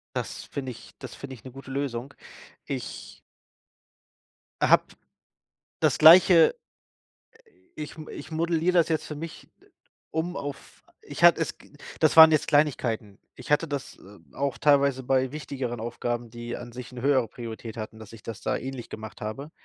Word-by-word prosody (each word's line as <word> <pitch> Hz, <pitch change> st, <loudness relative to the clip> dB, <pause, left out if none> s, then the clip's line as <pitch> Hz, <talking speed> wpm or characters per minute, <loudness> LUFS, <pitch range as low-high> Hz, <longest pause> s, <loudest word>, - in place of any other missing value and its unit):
das -, -, -4 dB
finde 130 Hz, -2 st, -5 dB
ich 120 Hz, -, -13 dB
das 125 Hz, -6 st, -9 dB
finde 140 Hz, -1 st, -8 dB
ich -, -, -18 dB
'ne 130 Hz, -, -10 dB
gute 135 Hz, 0 st, -11 dB
Lösung. 135 Hz, -1 st, -3 dB, 0.5 s
Ich -, -, -7 dB, 1.4 s
habe -, -, +5 dB, 1.0 s
das -, -, +2 dB
Gleiche 170 Hz, -, +8 dB, 1.2 s
ich 150 Hz, +1 st, -7 dB
m 155 Hz, -1 st, -9 dB
ich 150 Hz, +3 st, -9 dB
modelliere 165 Hz, +2 st, 0 dB
das 170 Hz, -, +3 dB
jetzt 160 Hz, -1 st, -1 dB
für 150 Hz, -, -6 dB
mich, 165 Hz, +2 st, -8 dB, 0.2 s
äh, -, -, -23 dB, 0.4 s
um 165 Hz, +3 st, -2 dB
auf 140 Hz, -1 st, -8 dB, 0.2 s
ich -, -, -8 dB
hat -, -, +8 dB
es -, -, -3 dB
g -, -, -20 dB, 0.3 s
das -, -, +3 dB
waren 160 Hz, 0 st, +11 dB
jetzt 155 Hz, -, +2 dB
Kleinigkeiten. 120 Hz, -9 st, +1 dB, 0.2 s
Ich 125 Hz, -, -11 dB
hatte 160 Hz, +2 st, +2 dB
das, 140 Hz, -2 st, -5 dB
äh, 100 Hz, +1 st, -15 dB, 0.2 s
auch 140 Hz, -1 st, -2 dB
teilweise 140 Hz, -2 st, +3 dB
bei 130 Hz, 0 st, +1 dB
wichtigeren 130 Hz, -5 st, -5 dB
Aufgaben, 120 Hz, 0 st, -4 dB
die 120 Hz, 0 st, -6 dB
an 120 Hz, 0 st, -9 dB
sich 125 Hz, 0 st, -8 dB
'ne 125 Hz, -1 st, -8 dB
höhere 135 Hz, -4 st, +2 dB
Priorität 115 Hz, 0 st, -8 dB
hatten, 110 Hz, 0 st, -7 dB
dass 110 Hz, 0 st, -12 dB
ich 115 Hz, -, -12 dB
das 115 Hz, 0 st, -7 dB
da -, -, 0 dB
ähnlich 130 Hz, -2 st, -6 dB
gemacht 110 Hz, 0 st, -9 dB
habe, 120 Hz, +8 st, -6 dB
135 Hz, 170 wpm, -26 LUFS, 120-150 Hz, 1.4 s, waren